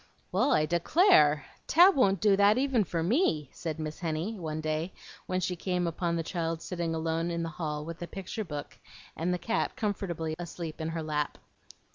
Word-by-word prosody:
"Well, - - +2
I 155 - +4
declare! 170 - +4 0.2
Tab 360 +5 +7
won't 195 -8 +3
do 205 -2 +5
that 205 +3 +5
even 260 -4 +2
for 170 -2 -2
me," 170 - +1
said 160 -3 -4
Miss 155 -1 -5
Henny, 170 +6 -2
one 155 -2 -3
day 155 +3 -2 0.3
when 185 - 0
she 180 0 -1
came 180 0 -1
upon 170 0 -1
the 165 - -1
child 165 -1 -3
sitting 170 -2 -2
alone 165 +1 -1
in 170 0 -2
the 165 - -3
hall 150 -2 -4
with 165 +1 -7
a 175 - -4
picture 195 +4 -5
book 150 -6 -7 0.4
and 170 +3 -1
the 180 - +1
cat 175 +7 -1
comfortably 185 -8 -2
asleep 170 -2 -6
in 160 - -2
her 165 0 -3
lap. 150 -1 -2
170 Hz, 190 wpm, -29 LUFS, 160-190 Hz, 0.4 s, Tab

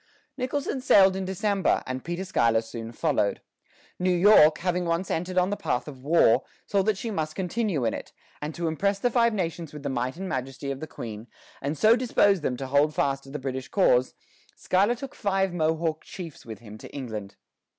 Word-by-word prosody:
" - - -39
Nicholson 270 0 -2
sailed 195 -5 +6
in 190 0 -3
December, 195 +1 +1
and 130 0 -4
Peter 175 +3 -4
Schuyler 115 -11 +2
soon 115 0 -7
followed. 135 -5 0 0.6
New 185 +1 +1
York, 175 -4 +6
having 180 0 -1
once 170 +2 -1
entered 180 +3 -2
on 180 +2 +3
the - - 0
path 125 -10 -2
of 135 -3 -10
war, 140 -5 +4 0.2
saw 200 -2 +1
that 210 +1 +1
she 225 +3 -4
must 155 -5 -3
continue 190 - -1
in 110 - +1
it; - - -7 0.3
and 150 +1 -4
to 170 -1 -2
impress 195 +6 0
the 245 +5 0
Five 235 -1 +3
Nations 170 -6 -3
with 150 -1 -9
the 140 - -2
might 130 +2 -2
and 190 +1 -5
majesty 135 -1 -4
of 135 - -5
the 155 - -6
Queen, 110 -3 -8 0.3
and 145 +3 -2
so 220 +7 +6
dispose 205 -6 +3
them 125 -4 -1
to 135 - -5
hold 145 +3 +2
fast 135 -1 0
to - - -12
the 145 - -4
British 130 -2 -4
cause, 130 -10 +2 0.4
Schuyler 200 +6 +2
took 270 +3 -8
five 195 -2 0
Mohawk 160 -1 0
chiefs 170 -10 -9
with 110 - -7
him 110 -2 -12
to - - -10
England. 110 -7 -6
165 Hz, 205 wpm, -26 LUFS, 135-195 Hz, 0.6 s, sailed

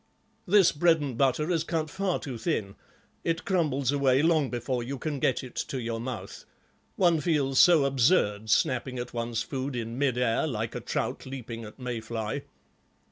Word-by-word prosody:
This 195 -1 +6
bread 165 +2 +3
and 140 -4 -4
butter 135 +6 +1
is 165 -3 +1
cut 165 -2 -1
far 190 +2 -1
too 130 -6 -6
thin; 110 - -2 0.5
it 165 0 -1
crumbles 145 -8 +1
away 140 -1 +3
long 160 -5 +3
before 120 +1 -2
you 135 +4 -4
can 145 +1 -3
get 130 0 +1
it 130 - -9
to 135 - -3
your 115 -1 -3
mouth. 120 -1 -6 0.5
One 170 -4 +3
feels 140 -6 +1
so 170 -6 +7
absurd, 120 - +2
snapping 130 +3 +1
at 120 0 -5
one's 115 -1 -2
food 135 -1 -4
in 115 +1 -4
mid 135 -4 +1
air, 125 +4 +1
like 115 -5 -3
a - - -3
trout - - -3
leaping 120 -4 -6
at 105 - -12
may 125 -3 -4
fly." 110 +4 -4
130 Hz, 180 wpm, -28 LUFS, 120-155 Hz, 0.5 s, so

